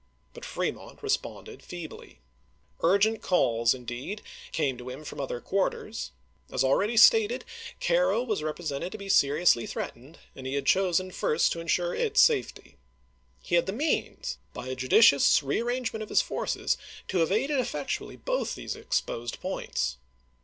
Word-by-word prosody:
But - - -11
Fremont - - -4
responded 425 +1 -3
feebly. 165 - -10 0.6
Urgent 200 +5 +3
calls 115 -9 +2
in 125 -1 -11
deed 125 - -5 0.3
came 140 -5 0
to 125 +1 -7
him 130 +4 -8
from 145 - -6
other 130 -3 -3
quarters. 190 - -2 0.4
As - - +1
already 205 - +2
stated, 445 - +6 0.3
Cairo - - +2
was 215 -9 -1
represented 155 +1 -3
to - - -5
be 200 -1 -8
seriously 145 -6 +4
threatened, 135 +8 -7 0.2
and 130 -1 -7
he 135 - -2
had 140 -1 -2
chosen 185 0 +2
first 155 -2 +1
to 170 - -3
insure 175 +1 0
its - - +1
safety. 70 +2 +2 0.7
He - - -7
had 170 +1 +4
the 190 - -2
means, 300 +8 -2 0.2
by 130 - -6
a 130 - -3
judicious 140 - +5
re 140 - 0
arrangement 240 -2 -2
of 215 - -6
his - - +4
forces, - - -1 0.3
to 185 - +1
have 165 +1 +2
aided 270 +7 +1
effec 255 - -2
tually - - -12
both - - -1
these - - -5
exposed 120 0 -3
points. 65 - -3
175 Hz, 160 wpm, -28 LUFS, 135-220 Hz, 0.7 s, stated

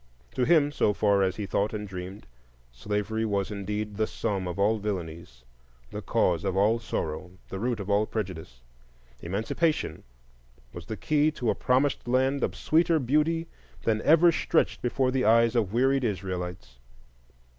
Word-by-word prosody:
To 125 - +1
him, 150 -2 +4
so 105 -7 +1
far 100 -1 +2
as 95 -1 +1
he 105 - -4
thought 100 +2 -1
and 105 -1 -5
dreamed, 95 +2 -8 0.5
slavery 105 - -2
was 100 -2 -1
indeed 105 +1 -4
the 110 0 +1
sum 95 -3 -3
of 90 - -5
all 105 +3 +2
villainies, 85 -9 -5 0.5
the - - -5
cause - - +1
of 95 - -1
all 110 +4 +3
sorrow, 90 -4 -4 0.2
the 95 - -5
root 120 +1 -1
of 100 - -6
all 105 +1 +2
prejudice; 80 - -6 0.6
Emancipation 110 - -1 0.7
was - - -9
the - - -5
key 150 0 +2
to 120 -6 0
a - - +1
promised 130 +1 0
land 130 +2 +1
of - - -1
sweeter 165 +1 +2
beauty 155 +5 +1 0.4
than 110 -1 +1
ever 165 +5 +6
stretched 160 0 0
before 130 +1 0
the 130 -1 0
eyes 115 +1 +4
of 110 -6 +1
wearied 135 +3 +2
Israelites. 90 - -4
105 Hz, 160 wpm, -27 LUFS, 95-130 Hz, 0.7 s, ever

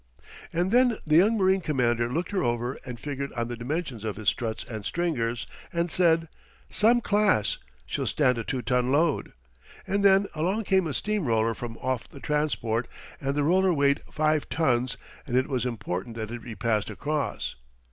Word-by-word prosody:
And 175 +3 0
then 245 -1 +4
the 155 0 +4
young 210 +6 +5
marine 190 -1 +3
commander 120 -6 +1
looked 170 +8 -2
her 195 - 0
over 120 +1 -1
and 120 -2 -6
figured 140 0 -4
on 120 0 -2
the 120 - -3
dimensions 130 -1 -4
of 110 -2 -2
his 110 -2 +2
struts 110 +1 -3
and 110 -3 -7
stringers, 120 -8 -1 0.3
and 170 0 -1
said: 165 -2 +3 0.4
"Some 235 +3 +4
class! 205 - +2 0.3
She'll - - -2
stand 125 -5 +2
a - - -2
two 125 +2 -3
ton 125 +2 +1
load." 155 +2 +1 0.5
And 200 +1 0
then 195 0 +6
along 185 +8 0
came 190 -3 +2
a 145 - -3
steam 210 -5 -1
roller 115 0 +2
from 115 0 -7
off 130 -2 -2
the 140 - -12
transport, 135 -6 0 0.3
and 140 0 -1
the 145 - +1
roller 185 +4 +4
weighed 140 -3 +2
five 155 -1 +1
tons 125 -6 +1 0.3
and 125 -1 +1
it 130 - +2
was 125 -3 -1
important 115 -2 -4
that 110 -1 -5
it 120 -1 -5
be 115 -3 -7
passed 105 0 0
across. 150 0 -2
140 Hz, 185 wpm, -27 LUFS, 120-170 Hz, 0.5 s, then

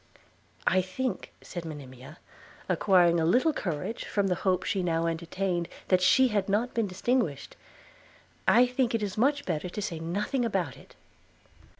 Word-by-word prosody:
'I 185 - +4
think,' 245 +8 -4
said 175 - -6
Monimia, 140 -2 -10 0.5
acquiring 175 -4 +4
a - - +1
little 250 - +3
courage 175 - -4
from 200 -1 0
the 190 - +2
hope 185 -1 +1
she 195 - -1
now 165 -2 0
entertained 170 +1 -2 0.2
that 185 -1 +4
she 260 +8 +5
had 205 -3 -1
not 225 +5 0
been 230 -3 0
distinguished, 185 - -1 0.9
'I 245 - +6
think 250 -1 0
it 220 - -1
is 200 -2 -3
much 285 +5 +1
better 175 0 -2
to 195 - -6
say 175 -6 -3
nothing 200 - -1
about 190 - -1
it.' - - -17
185 Hz, 160 wpm, -28 LUFS, 170-230 Hz, 0.9 s, I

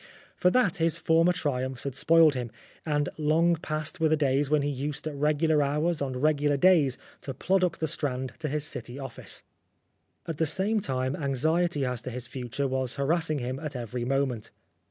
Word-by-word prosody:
For 180 - +3
that 195 -4 +2
his 165 -1 +1
former 165 +2 +3
triumphs 130 -7 -2
had 140 - -3
spoiled 160 +2 +5
him, 125 -3 -3 0.4
and 145 -1 +1
long 165 +3 +3
past 155 +2 -4
were 160 -1 +3
the 155 - +3
days 140 -1 +1
when 150 -1 +3
he 145 - 0
used 140 +2 -4
at 155 - -3
regular 150 +2 +2
hours 150 +3 0
on 130 -2 -2
regular 145 -1 +2
days 150 -5 +4 0.2
to 135 - -6
plod 190 +7 +1
up 175 -2 +1
the 160 - -1
Strand 130 -4 -2
to 155 -2 -3
his 150 +1 -1
city 130 -4 -5
office. 135 -3 -6 0.8
At 165 -3 -5
the 160 - +2
same 195 +7 +1
time, 130 -5 -1
anxiety 150 +2 0
as 125 -2 -2
to 130 - -6
his 125 0 -6
future 125 +2 -3
was 130 -1 -2
harassing 155 +2 0
him 130 0 -3
at 150 -2 -6
every 120 0 -4
moment. 130 -3 -1
145 Hz, 190 wpm, -28 LUFS, 130-160 Hz, 0.8 s, spoiled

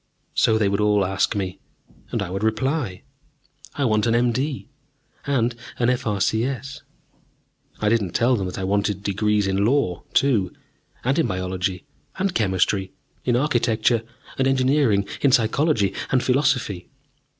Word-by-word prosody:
So 110 - +3
they 105 -2 +2
would 100 +1 0
all 105 -2 +3
ask 95 +2 0
me. 95 -2 -3 0.5
And - - -1
I 90 - -6
would 95 +2 -3
reply; 110 - -1 0.7
"I 140 - 0
want 110 -2 +2
an 115 - +2
M.D. 125 +4 0 0.6
and 125 -4 +1 0.2
an 120 0 +2
F.R.C.S." 125 +3 -1 1.0
I 105 - 0
didn't 105 -5 +1
tell 125 +2 +3
them 95 -4 -2
that 90 - -6
I 95 - -3
wanted 100 +1 0
degrees 105 +1 +1
in 95 +1 +1
Law, 110 -7 +1
too, 115 -10 +2 0.5
and 135 +5 +1
in 165 - +2
Biology 95 0 -3 0.3
and 190 -1 0
Chemistry, 95 -2 +1 0.3
in 120 - +2
Architecture 120 -4 +2 0.4
and 135 - +3
Engineering, 130 -6 +2
in 140 - +4
Psychology 115 - +2 0.2
and 130 -1 +2
Philosophy. 125 - 0
110 Hz, 140 wpm, -23 LUFS, 100-130 Hz, 1.0 s, in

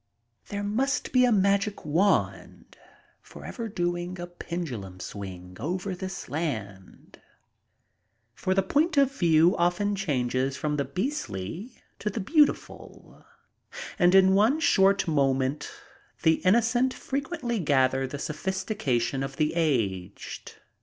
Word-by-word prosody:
There 205 0 -4
must 260 +8 -1
be 255 -1 +5
a 245 - +3
magic 200 -1 +1
wand 175 +7 0 0.5
forever 230 -3 -7
doing 175 -1 -2
a 175 - -4
pendulum 155 - -6
swing 90 -2 -8
over 180 - -3
this 190 +1 -6
land, 110 - -6 1.1
for 185 +10 -1
the 195 - +3
point 300 - +1
of 275 -1 +5
view 165 -3 +4
often 175 +4 +1
changes 135 -6 -1
from 150 0 -2
the 140 - 0
beastly 180 - -5 0.2
to 210 - -2
the 225 - -4
beautiful, 295 - 0 0.8
and 180 +1 +5
in 190 0 +6
one 220 +10 +3
short 195 - +3
moment 135 -1 +1 0.5
the 160 0 +4
innocent 235 +6 +2
frequently 275 -4 -3
gather 135 -4 +2
the 145 - -6
sophistication 150 - -2
of 135 0 -4
the 155 +2 0
aged. 110 - -2
175 Hz, 120 wpm, -27 LUFS, 135-205 Hz, 1.1 s, in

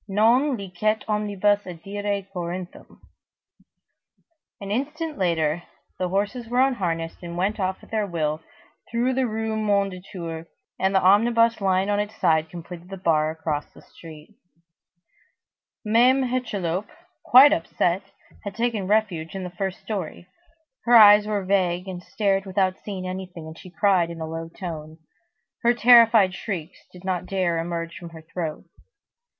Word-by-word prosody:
Non 235 +7 +3
licet 200 +2 -2
omnibus 205 -1 +1
adire 200 +3 -4
Corinthum." 180 +1 -7 1.6
An 200 -1 -6
instant 300 +6 -3
later, 165 -3 +1 0.4
the 180 -1 -1
horses 205 +5 -2
were 245 +1 +1
unharnessed 175 -11 0
and 170 -1 -7
went 200 +4 -1
off 190 -1 -2
at - - -17
their 215 -2 0
will, 155 -3 -2 0.5
through 240 +3 0
the 260 0 +1
Rue 220 0 -2
Mondétour, 185 -5 -2 0.3
and 190 +1 +1
the 190 - +4
omnibus 230 +3 +4
lying 190 0 +2
on 205 - +1
its 210 +1 -3
side 160 -5 +2
completed 175 +1 -10
the 195 - -7
bar 155 -4 +2
across 155 -2 -4
the - - -17
street. 160 +3 -14 1.5
Mame 245 +5 +4
Hucheloup, 210 -7 -2 0.4
quite 270 +4 +8
upset, 175 +2 0 0.4
had 200 -1 -6
taken 230 -4 -1
refuge 195 -6 0
in 190 - -4
the 180 - -6
first 190 +1 -4
story. 190 -4 -5 0.6
Her 240 0 +5
eyes 210 -1 +8
were 205 -3 -2
vague, 185 -1 +1
and 180 -2 -6
stared 195 0 -1
without 190 -1 0
seeing 190 -3 -5
anything, 185 -3 -7
and 160 0 -9
she 185 - -12
cried 185 -2 +2
in 170 -1 -8
a 160 - -3
low 165 +1 -6
tone. 160 -3 -7 0.6
Her 240 +1 +3
terrified 230 -5 +6
shrieks 180 -4 -6
did 180 0 -14
not 185 -1 -2
dare 185 -3 0
to - - 0
emerge 170 0 -4
from 170 - -9
her 160 -1 -12
throat. 160 0 -5
190 Hz, 150 wpm, -24 LUFS, 170-215 Hz, 1.6 s, quite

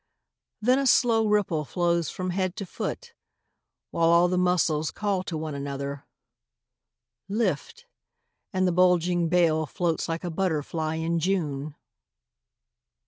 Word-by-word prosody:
Then 250 +4 +4
a 275 - +1
slow 225 -3 +4
ripple 200 -7 +1
flows 170 +1 0
along 185 0 -2
the 185 0 -3
body, - - -2 0.9
While 165 0 +2
all 170 +1 +5
the 180 - 0
muscles 165 -4 +1
call 200 -3 -1
to 165 - -4
one 155 -1 -4
another: 140 0 -5 0.6
" - - -57
Lift! 195 - -3 0.3
" - - -53
and 185 -1 +1
the - - +2
bulging 175 -1 +3
bale 160 -3 +2
Floats 165 +2 -1
like 165 +2 -3
a 175 - -3
butterfly 160 -2 -1
in 165 +1 -1
June. 155 -5 -2
170 Hz, 135 wpm, -26 LUFS, 155-185 Hz, 0.9 s, all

